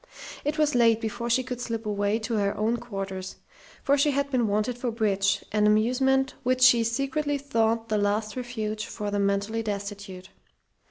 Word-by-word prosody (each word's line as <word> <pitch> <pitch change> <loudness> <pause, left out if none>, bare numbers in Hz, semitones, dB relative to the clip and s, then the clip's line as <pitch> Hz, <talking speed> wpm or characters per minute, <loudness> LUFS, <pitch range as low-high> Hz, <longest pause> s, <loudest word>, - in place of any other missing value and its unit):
It 295 +2 -1
was 300 -1 +2
late 230 -2 +4
before 235 +1 -4
she 255 +2 +2
could 250 -1 -5
slip 230 -2 -4
away 205 0 0
to 235 - -3
her 200 -1 0
own 220 +3 +1
quarters, 195 -5 -6 0.5
for 280 +1 +3
she 295 - +4
had 280 0 -1
been 245 -4 +2
wanted 215 +4 0
for 245 - -1
bridge, 200 -4 0
an 210 0 +3
amusement 265 +5 +2
which 255 0 0
she 240 -3 +7
secretly 275 +5 -1
thought 230 -4 0
the 215 -1 +1
last 210 +1 0
refuge 220 -4 -4
for 205 -1 -4
the 205 - 0
mentally 200 +3 0
destitute. 200 -3 -6
225 Hz, 175 wpm, -26 LUFS, 205-255 Hz, 0.5 s, she